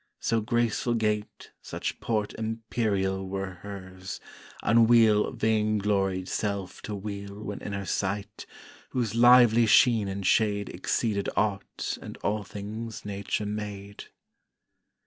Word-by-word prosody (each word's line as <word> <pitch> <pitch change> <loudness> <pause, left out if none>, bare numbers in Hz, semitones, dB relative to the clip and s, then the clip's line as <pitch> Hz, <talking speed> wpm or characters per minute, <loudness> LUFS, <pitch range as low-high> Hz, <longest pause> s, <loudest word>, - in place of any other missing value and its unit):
So 115 -1 +1
graceful 120 +1 0
gait, 105 -2 -2
such - - -4
port 105 -3 -1
imperial 110 -4 -1
Were 95 -2 -4
hers, 95 -2 -8 0.4
unweal 115 -1 +5
vainglory'd 105 -4 +1
self 100 -3 -3
to 105 - -2
weal 100 0 -6
When 105 -1 -5
in 100 - -5
her 100 0 -3
sight, 100 +2 -3 0.4
whose 120 -5 -1
lively 120 -1 +7
sheen 115 -2 +5
and 95 0 -4
shade 100 -1 +2
Exceeded 105 -4 -1
aught 105 -2 -1
and - - -8
all 105 +1 0
things 105 +3 -7
Nature 100 +1 -2
made. 105 -1 -6
105 Hz, 115 wpm, -27 LUFS, 100-110 Hz, 0.4 s, lively